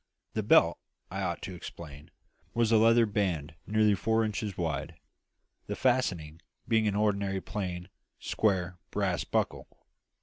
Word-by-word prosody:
The - - 0
belt, - - +5 0.3
I 95 +1 -3
ought 85 -2 -2
to 95 - -5
explain, 80 -3 -9 0.5
was 115 -1 +2
a 115 - +6
leather 115 +1 +6
band 90 -8 -1
nearly 110 0 +4
four 110 +4 +1
inches 105 -2 -3
wide, 80 -5 -2 0.7
the - - -3
fastening 90 -12 0 0.3
being 110 -1 +3
an 100 - 0
ordinary 100 -2 +1
plain, 90 -4 -4 0.3
square, 90 -4 0
brass - - 0
buckle. - - -1
100 Hz, 135 wpm, -30 LUFS, 90-110 Hz, 0.7 s, a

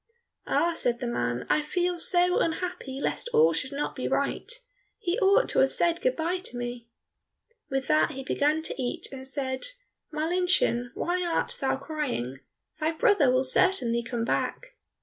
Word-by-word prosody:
"Ah," 340 0 +2
said 240 -7 -1
the 250 - -4
man, 125 - -2
"I 305 - +2
feel 355 +3 -1
so 355 +1 +3
unhappy 320 -5 -3
lest 480 - -2
all 465 +1 +5
should 260 - -2
not 285 +1 -3
be - - -3
right. - - -1 0.5
He 385 -1 -2
ought 400 +4 +4
to - - +1
have 270 - +3
said 340 0 +1
good - - +1
bye 340 +3 -1
to 360 -9 -6
me." 240 -1 -5 0.8
With 270 0 -2
that 305 0 +3
he 270 -3 -7
began 300 +4 0
to 275 - -4
eat 245 - -3
and 265 -1 -9
said, 265 -1 -3 0.5
"Marlinchen, 320 -6 +1
why 360 +1 -1
art 340 -2 +2
thou 270 -1 +1
crying? 270 - -4 0.4
Thy 315 +1 0
brother 360 - +3
will 255 +1 +2
certainly 255 -6 +5
come 230 0 -3
back." - - -2
300 Hz, 170 wpm, -27 LUFS, 255-355 Hz, 0.8 s, all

